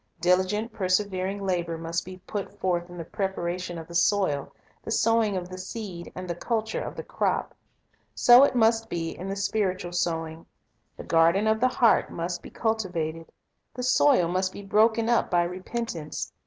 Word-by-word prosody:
Diligent, 185 +6 +1
persevering 190 0 -1
labor 170 -3 -1
must 165 +1 -3
be 185 0 -9
put 205 -1 -5
forth 175 -2 -1
in 175 - -10
the 165 - -4
preparation 180 -1 -3
of 160 -1 -8
the 170 - -11
soil, 170 -5 +1 0.3
the - - -7
sowing 225 -3 +2
of 175 -1 -4
the 185 0 -8
seed, 185 -3 -7
and 185 0 -6
the 170 - -2
culture 220 +5 -2
of - - -6
the - - -6
crop. - - -1 0.6
So 245 +2 +8
it 280 - +3
must 225 -1 +3
be 165 -1 -3
in 185 +3 -6
the 195 - -2
spiritual 195 -3 -1
sowing. 165 -2 -2 0.5
The - - -7
garden 170 +5 +3
of 220 0 +2
the 255 - +4
heart 245 -3 +3
must 170 +1 -3
be - - -10
cultivated. 175 -8 -2 0.4
The 250 - -4
soil 170 - +4
must 185 +2 0
be 200 - -9
broken 220 +3 +3
up 235 0 +2
by 175 -1 +3
repentance. 180 -2 -5
185 Hz, 175 wpm, -26 LUFS, 170-220 Hz, 0.6 s, So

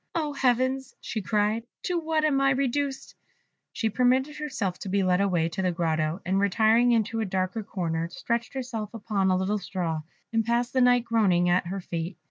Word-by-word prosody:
"Oh, 305 -3 -1
Heavens!" 260 0 0
she 220 - -4
cried, 210 +2 0 0.2
"to 355 -1 0
what 315 -1 0
am 275 -3 +2
I 275 - +4
reduced?" 275 +1 -1 0.6
She 225 - -1
permitted 255 +5 +2
herself 230 - -3
to 195 - -6
be 195 +1 +1
led 185 +1 +2
away 175 -5 +2
to 170 - -3
the 185 -1 +1
grotto, 160 0 -1
and 190 +2 +1
retiring 220 +5 +4
into 225 -1 +1
a 220 - 0
dark 185 -1 -1
corner, 165 -4 -2
stretched 235 +8 -3
herself 235 -5 -4
upon 205 -3 0
a 185 - +3
little 200 +3 0
straw, 175 -4 -3 0.3
and 225 0 +2
passed 235 +2 0
the 260 - +3
night 245 -1 +5
groaning 195 -7 +3
at 175 0 +2
her 195 +2 -4
fate. 170 +1 -5
215 Hz, 190 wpm, -27 LUFS, 185-250 Hz, 0.6 s, night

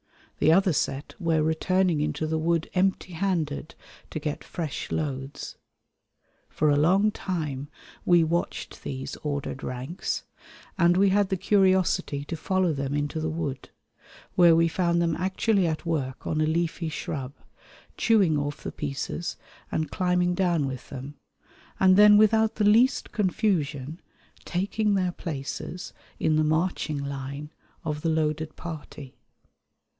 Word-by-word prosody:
The 155 - +5
other 190 +1 +4
set 140 0 -2
were 165 -3 +2
returning 170 +1 +1
into 155 +1 -1
the 160 0 -1
wood 165 0 +1
"empty 185 -1 0
handed" 160 -5 -2 0.3
to - - -5
get 150 -1 -3
fresh 160 -5 -5
loads. 140 -2 -4 0.9
For 150 -1 +2
a - - +4
long 190 +8 +4
time 150 -9 -3 0.4
we 175 -2 +5
watched 170 +2 -2
these 135 -1 -5
ordered 145 -2 -4
ranks, 130 +8 -4 0.6
and 175 0 +5
we 195 +1 +5
had 200 0 +2
the 190 - 0
curiosity 185 -7 +2
to 165 - -4
follow 185 +1 +1
them 140 0 -2
into 145 +2 -1
the 160 0 -1
wood, 150 -5 -4 0.6
where 170 -2 +6
we 165 0 +4
found 170 0 +1
them 165 -2 +1
actually 190 +1 +1
at 160 +1 -3
work 140 -6 -2
on 155 -1 0
a 155 - +2
leafy 165 +1 -1
shrub, 135 -3 -5 0.6
chewing 195 -10 +3
off 145 0 -4
the - - -4
pieces 150 +4 -4 0.3
and 155 - -1
climbing 180 -1 +1
down 175 -5 +1
with 130 -2 -6
them, 135 +2 -7 0.7
and 185 -1 +6
then 210 +1 +8
without 220 +1 +4
the 210 - +1
least 230 +5 +4
confusion 165 - -1 0.4
taking 200 +3 0
their 185 -2 +1
places 165 +2 -6 0.3
in 155 -1 +2
the 155 - +3
marching 155 0 0
line 140 +1 -5 0.3
of 150 -1 -2
the 165 - 0
loaded 155 -1 -1
party. 150 -5 -8
160 Hz, 140 wpm, -26 LUFS, 145-185 Hz, 0.9 s, then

